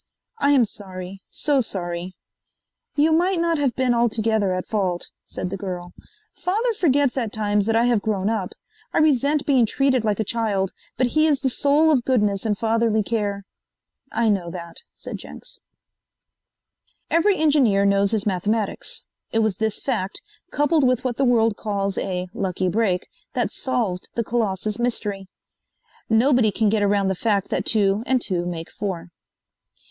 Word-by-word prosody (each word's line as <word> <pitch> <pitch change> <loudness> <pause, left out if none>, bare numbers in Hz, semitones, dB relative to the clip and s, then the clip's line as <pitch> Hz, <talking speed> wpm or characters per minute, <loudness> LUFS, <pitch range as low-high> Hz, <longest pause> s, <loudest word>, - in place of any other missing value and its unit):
"I 280 - +3
am 260 -4 +5
sorry 190 -2 -9
so 285 -3 +2
sorry." 180 -4 -4 0.8
"You 305 +2 +3
might 350 +3 +2
not 335 -2 +1
have 275 -4 +1
been 255 -2 +2
altogether 220 -3 +1
at 185 0 -2
fault," 185 -5 -1
said 180 - -5
the 195 - -3
girl. 180 -2 -6 0.4
"Father 445 +6 0
forgets 285 - +2
at 230 -5 -1
times 210 -1 0
that 225 - +2
I 230 +1 +4
have 240 -4 +2
grown 200 -3 -1
up. 210 -4 -1 0.4
I - - 0
resent 290 -1 +3
being 260 -5 +4
treated 260 0 +1
like 210 -2 0
a - - +2
child, 205 -4 -1 0.3
but 255 - +3
he 310 +1 +4
is 290 -3 +2
the 265 -2 +1
soul 295 +5 +3
of 260 -5 +2
goodness 210 -5 +1
and 210 -2 0
fatherly 225 -1 +1
care." 200 -2 -2 0.7
"I 235 - +1
know 195 -5 +1
that," 170 -1 -8
said - - -7
Jenks. - - -9 1.5
Every 380 +4 +3
engineer 265 -11 +3
knows 200 0 +3
his 215 -1 -1
mathematics. 215 - -1 0.3
It 225 0 +2
was 210 -4 0
this 220 -1 -2
fact, 215 -8 -2 0.3
coupled 295 +1 +2
with 255 -1 +2
what 250 -3 -2
the 275 - +2
world 230 -3 +3
calls 200 -2 -2
a 180 -1 -3
"lucky 185 -1 -1
break," 190 -3 0 0.3
that - - -1
solved 220 -9 -2
the 235 - 0
Colossus 215 -2 -1
mystery. 210 -5 -1 0.8
Nobody 235 0 +4
can 210 +1 +1
get 215 0 +1
around 200 -1 +2
the - - +1
fact 200 0 0
that - - -1
two 205 -2 +3
and 260 -1 +3
two 175 -6 -1
make 165 -2 -5
four. 185 -4 -5
220 Hz, 165 wpm, -23 LUFS, 195-260 Hz, 1.5 s, am